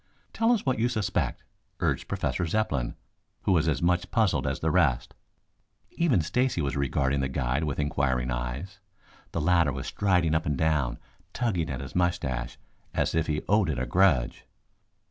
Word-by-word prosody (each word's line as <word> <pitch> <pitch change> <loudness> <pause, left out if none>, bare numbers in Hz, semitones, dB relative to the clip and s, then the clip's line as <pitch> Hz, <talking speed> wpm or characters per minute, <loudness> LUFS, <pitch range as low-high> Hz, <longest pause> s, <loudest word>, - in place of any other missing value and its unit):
"Tell 225 +1 +2
us 235 -4 +1
what 130 -4 +1
you 120 +2 +2
suspect," 110 -6 -1 0.4
urged - - 0
Professor 90 - -1
Zepplin, 75 - -1 0.5
who - - +1
was 80 -3 +3
as 80 +1 0
much 90 0 +1
puzzled 110 -5 +1
as - - -1
the 80 - 0
rest. 75 -9 +2 0.8
Even 135 - +2
Stacy 125 +5 0
was 70 -4 -1
regarding 70 0 0
the 65 - 0
guide 65 +4 -1
with 70 -2 -2
inquiring 65 -4 0
eyes. 60 +11 -4 0.5
The 85 - -2
latter 85 -2 +3
was 65 0 -5
striding 90 -5 +1
up 80 -1 0
and 75 -3 0
down, 75 -6 +1 0.4
tugging 95 -9 -1
at 65 -2 -4
his 70 - -8
moustache 85 -9 -1 0.4
as - - +1
if 80 -1 +1
he 75 -1 -1
owed 105 -3 +3
it 70 - -1
a 65 - -1
grudge. 70 -3 +2
80 Hz, 170 wpm, -27 LUFS, 65-95 Hz, 0.8 s, was